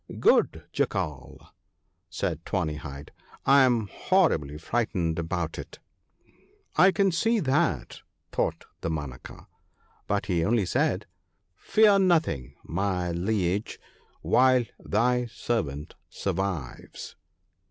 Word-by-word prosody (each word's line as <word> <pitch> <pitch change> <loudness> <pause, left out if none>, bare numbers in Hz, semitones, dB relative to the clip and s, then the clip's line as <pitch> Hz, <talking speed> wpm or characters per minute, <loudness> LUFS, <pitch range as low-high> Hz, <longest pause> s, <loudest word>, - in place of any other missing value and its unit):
'Good - - +3
Jackal/ 70 -4 -3 0.6
said - - -3
Tawny 75 -1 -2
hide, 70 -1 -9 0.3
'I 140 +1 +6
am 120 -5 +2
horribly 80 - +1
frightened 85 -4 -1
about 85 -1 -3
it.' - - -9 0.5
' - - -35
I - - +8
can 195 +2 +2
see 225 +7 +2
that/ 155 0 0 0.3
thought - - -1 0.2
Damanaka; 75 -6 -5 0.6
but 100 -1 0
he 90 -3 0
only 110 +1 +2
said, 85 - 0 0.3
' 85 - -49
Fear 210 - +4
nothing, 160 - +1
my 90 0 -1
liege, 95 +2 -1 0.4
while 130 -1 +4 0.2
thy 125 0 +1
servant 110 - -3 0.2
survives.' 95 -7 -4
100 Hz, 105 wpm, -27 LUFS, 80-130 Hz, 0.6 s, I